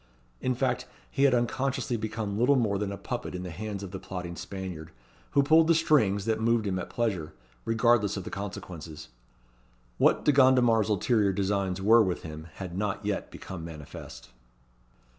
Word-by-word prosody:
In 130 0 0
fact, - - -1 0.2
he 140 - +2
had 135 -2 +5
unconsciously 130 +1 -1
become 110 -2 -3
little 130 +4 +4
more 105 -6 +1
than 100 -1 -2
a 100 - -5
puppet - - -5
in 90 - -5
the 90 - -6
hands 100 +3 -5
of 95 - -7
the 95 - -6
plotting 90 -2 -6
Spaniard, 90 -5 -6 0.4
who 140 - +5
pulled 160 +3 +5
the 165 - +5
strings 110 -12 +3
that 110 -1 0
moved 115 -1 +2
him 95 -2 -1
at 90 - -6
pleasure, 95 -10 -2 0.3
regardless 115 -3 +2
of 95 - -4
the - - -7
consequences. 85 -5 -7 0.9
What - - +3
De - - +6
Gondomar's 125 -5 +4
ulterior 105 0 +2
designs 95 -1 -1
were 115 +3 +7
with 95 -4 -1
him 80 0 -8
had 90 -3 -6
not 100 +1 -2
yet 105 -1 -2
become 90 -4 -8
manifest. 75 -6 -9
105 Hz, 175 wpm, -28 LUFS, 95-120 Hz, 0.9 s, were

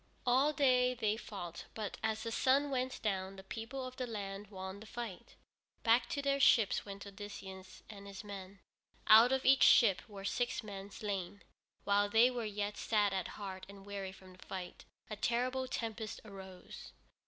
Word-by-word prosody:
All 260 +4 +4
day 250 -4 +3
they 215 -3 +1
fought, 195 -6 -7
but 215 -2 -4
as 220 0 -1
the 230 - -3
sun 275 +4 +3
went 255 -1 -1
down 195 -2 -1
the 190 - -10
people 230 +6 -5
of 255 0 -8
the 255 - -2
land 200 -2 -5
won 190 0 -7
the 215 - -11
fight. 235 -1 -7 0.5
Back 230 +1 +4
to 280 - -2
their 280 0 +2
ships 225 -6 +5
went 200 0 -8
Odysseus 195 -2 -9
and 200 -2 -10
his 195 0 -8
men. 195 -1 -9 0.4
Out 225 +3 +8
of 265 0 +1
each 270 +1 +6
ship 195 -8 +7
were 195 -1 -8
six 240 +2 -1
men 200 -1 -7
slain. 200 -2 -4 0.4
While 205 0 +3
they 230 +4 +6
were 240 -2 -3
yet 205 0 -3
sad 210 -3 +2
at 190 -2 -1
heart 190 -3 -6
and 200 -1 -12
weary 200 -2 -5
from 190 -1 -14
the 185 - -15
fight, 185 -2 -7 0.2
a 215 - -5
terrible 250 +4 0
tempest 225 -3 -4
arose. 190 -3 -10
210 Hz, 175 wpm, -35 LUFS, 195-240 Hz, 0.5 s, Out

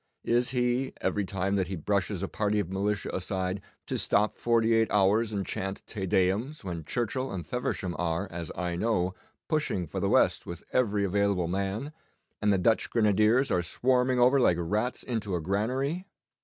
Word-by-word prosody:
Is 120 +1 +2
he, 125 +1 0
every 105 - 0
time 95 +1 -1
that 95 -3 0
he 95 - -4
brushes 100 +2 -1
a - - -1
party 105 +1 0
of 90 -3 -3
militia 100 +1 -1
aside, 95 +1 -2 0.2
to - - -1
stop 105 +1 +2
forty 115 -1 +2
eight 115 0 +2
hours 105 +3 +3
and 100 -2 -2
chant 95 +1 -4
"Te 95 -4 -4
Deums" 100 +12 +1
when 85 -4 -5
Churchill 120 - -2
and 90 -3 -5
Feversham 95 -7 -2
are, 85 +2 -1
as 85 -2 -5
I 90 -1 -2
know, 90 -2 0 0.3
pushing 150 - 0
for - - -5
the - - 0
West - - +3
with 85 -1 -7
every 105 -5 +2
available 100 -2 +1
man, 100 - -2 0.5
and 105 -1 +3
the 100 - +3
Dutch 110 +5 +2
grenadiers 110 +4 +3
are 90 - +2
swarming 125 +7 +1
over 125 +3 +5
like 90 -9 +4
rats 105 +9 -1
into 110 -6 -2
a - - 0
granary? 130 - -1
100 Hz, 180 wpm, -28 LUFS, 95-120 Hz, 0.5 s, over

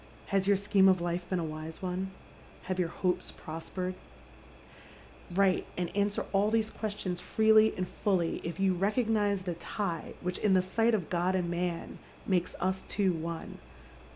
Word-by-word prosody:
Has 195 -1 +2
your 200 -1 +5
scheme 195 -1 +4
of 185 -1 +4
life 175 +1 -2
been 185 - +1
a 170 - -1
wise 155 0 -6
one? 185 +1 -2 0.5
Have 185 0 -3
your 180 - +2
hopes 180 +1 -1
prospered? 180 +3 -5 0.7
" - - -20
Wnte 190 -1 +3
and 175 +1 -2
answer 205 0 +1
all 200 +2 +3
these 220 0 +1
questions 200 -4 -3
freely 220 +2 +5
and 185 0 -1
fully 180 -5 0
if 170 +3 -5
you 195 -1 +3
recognise 205 0 +1
the 180 -2 -2
tie 170 0 -4
which, 180 0 -3
in 200 -3 +3
the 185 - +4
sight 225 +5 +2
of 185 -7 -3
God 180 +1 +1
and 175 -2 0
man, 175 -1 -3 0.3
makes 180 -3 0
us 190 +1 0
two 195 -3 +1
one. 165 0 -5
185 Hz, 170 wpm, -31 LUFS, 175-200 Hz, 0.7 s, your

